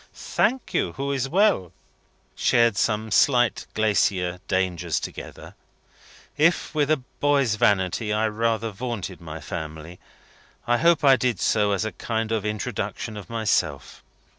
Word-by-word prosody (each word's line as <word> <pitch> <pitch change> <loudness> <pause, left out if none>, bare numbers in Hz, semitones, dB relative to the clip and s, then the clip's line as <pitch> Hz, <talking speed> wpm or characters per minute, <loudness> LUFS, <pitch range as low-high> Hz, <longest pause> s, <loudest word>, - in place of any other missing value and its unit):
"Thank 260 +1 -1
you. - - 0
Who 140 +1 -3
is 135 -1 -1
well." 180 - +2 0.3
" - - -39 0.3
Shared 115 -3 +3
some 110 +1 0
slight 120 -4 +3
glacier 95 -4 +1
dangers 95 -3 0
together. - - -9 0.8
If, 165 +4 +2
with 150 -2 +1
a 155 - +4 0.2
boy's 140 -5 +2
vanity, 105 0 +1
I 110 +1 +1
rather 115 +1 -1
vaunted 100 -4 -5
my 80 -1 -7
family, 80 0 -7 0.7
I 120 0 +2
hope 170 -1 +3
I 135 -2 +6
did 125 -2 0
so 105 -2 +2
as 100 +2 0
a 110 - -3
kind 110 +3 -3
of 110 -3 0
introduction 105 +1 -4
of 105 -3 -9
myself. 115 -2 -1
110 Hz, 140 wpm, -24 LUFS, 95-130 Hz, 0.8 s, I